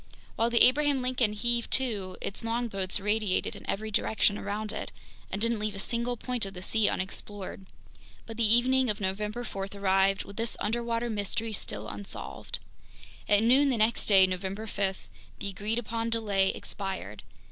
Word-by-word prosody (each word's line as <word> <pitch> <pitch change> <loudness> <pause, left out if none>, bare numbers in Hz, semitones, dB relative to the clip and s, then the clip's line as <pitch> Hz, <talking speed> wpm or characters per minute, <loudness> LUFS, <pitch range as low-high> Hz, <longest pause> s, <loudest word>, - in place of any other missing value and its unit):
While 230 +1 +2
the 235 0 +5
Abraham 280 0 +3
Lincoln 250 -4 +1
heaved 235 +2 0
to, 205 -8 0
its 200 - -3
longboats 225 -5 0
radiated 210 -1 0
in - - -10
every 215 +2 -2
direction 205 0 +2
around 210 +1 -3
it - - -5 0.4
and 195 - -3
didn't 230 0 +1
leave 210 -1 -2
a - - -6
single 235 +4 -1
point 250 +1 -2
of 195 0 -4
the 180 - -6
sea 220 +1 +3
unexplored. 190 0 -4 0.6
But 225 -1 -8
the 220 -2 +3
evening 260 +1 +4
of 210 +1 0
November 210 +4 -2
4 195 -4 -4
arrived 195 0 +2
with 200 - -12
this 230 0 -1
underwater 235 +1 -1
mystery 215 +2 -2
still - - -4
unsolved. 200 - -5 0.7
At 205 0 +5
noon 265 +5 +5
the 255 - +1
next 220 +1 +2
day, 195 -2 +8
November 190 +3 -3
5, 195 -3 -2 0.3
the 200 - -3
agreed 205 +4 -2
upon 230 0 -2
delay 205 -4 +2
expired. 190 - -5
215 Hz, 170 wpm, -29 LUFS, 195-235 Hz, 0.7 s, day